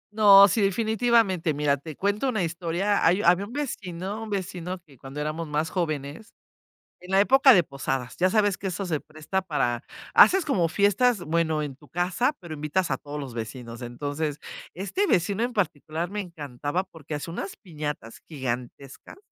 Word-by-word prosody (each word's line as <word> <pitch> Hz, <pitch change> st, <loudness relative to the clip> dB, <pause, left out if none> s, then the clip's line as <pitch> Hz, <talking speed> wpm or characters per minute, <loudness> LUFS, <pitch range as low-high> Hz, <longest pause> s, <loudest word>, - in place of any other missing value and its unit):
No, 200 Hz, -2 st, +9 dB
sí, 210 Hz, +3 st, +1 dB
definitivamente, 215 Hz, -5 st, +2 dB
mira, 145 Hz, -1 st, +1 dB
te 155 Hz, +2 st, -9 dB
cuento 205 Hz, +6 st, 0 dB
una 215 Hz, -7 st, 0 dB
historia, 175 Hz, +4 st, -1 dB
hay 180 Hz, +5 st, +3 dB
había 180 Hz, +4 st, +4 dB
un -, -, -12 dB
vecino 205 Hz, -7 st, -4 dB
un 225 Hz, -, -6 dB
vecino 185 Hz, -2 st, -4 dB
que 140 Hz, -3 st, -19 dB
cuando 135 Hz, +2 st, -8 dB
éramos 155 Hz, +2 st, -3 dB
más 150 Hz, +2 st, -1 dB
jóvenes, 155 Hz, +3 st, -4 dB, 0.6 s
en 180 Hz, +1 st, -11 dB
la 195 Hz, -, +4 dB
época 265 Hz, +3 st, +6 dB
de 180 Hz, -, +6 dB
posadas, 135 Hz, -3 st, -4 dB
ya 185 Hz, +1 st, +2 dB
sabes 205 Hz, -3 st, +2 dB
que 195 Hz, -, -10 dB
eso 185 Hz, +1 st, -3 dB
se 155 Hz, -4 st, -1 dB
presta 155 Hz, +5 st, -4 dB
para 120 Hz, -8 st, -1 dB, 0.3 s
haces 380 Hz, -2 st, +7 dB
como 185 Hz, -, +1 dB
fiestas, 205 Hz, +6 st, +2 dB
bueno, 160 Hz, -2 st, 0 dB
en 145 Hz, -3 st, -5 dB
tu 145 Hz, +2 st, -20 dB
casa, 180 Hz, -, 0 dB
pero 170 Hz, -4 st, -8 dB
invitas 150 Hz, +5 st, -1 dB
a -, -, 0 dB
todos 145 Hz, +1 st, -7 dB
los 135 Hz, -4 st, -7 dB
vecinos, 115 Hz, +1 st, -7 dB
entonces, 145 Hz, +4 st, -3 dB, 0.3 s
este 200 Hz, -, -1 dB
vecino 200 Hz, -, +1 dB
en 245 Hz, -, -2 dB
particular 165 Hz, -3 st, -2 dB
me 210 Hz, 0 st, -3 dB
encantaba 150 Hz, 0 st, -4 dB
porque 160 Hz, -4 st, -10 dB
hacía 150 Hz, +3 st, -4 dB
unas 195 Hz, -, -5 dB
piñatas 150 Hz, -, -6 dB
gigantescas, 130 Hz, -, -6 dB
170 Hz, 175 wpm, -26 LUFS, 150-200 Hz, 0.6 s, No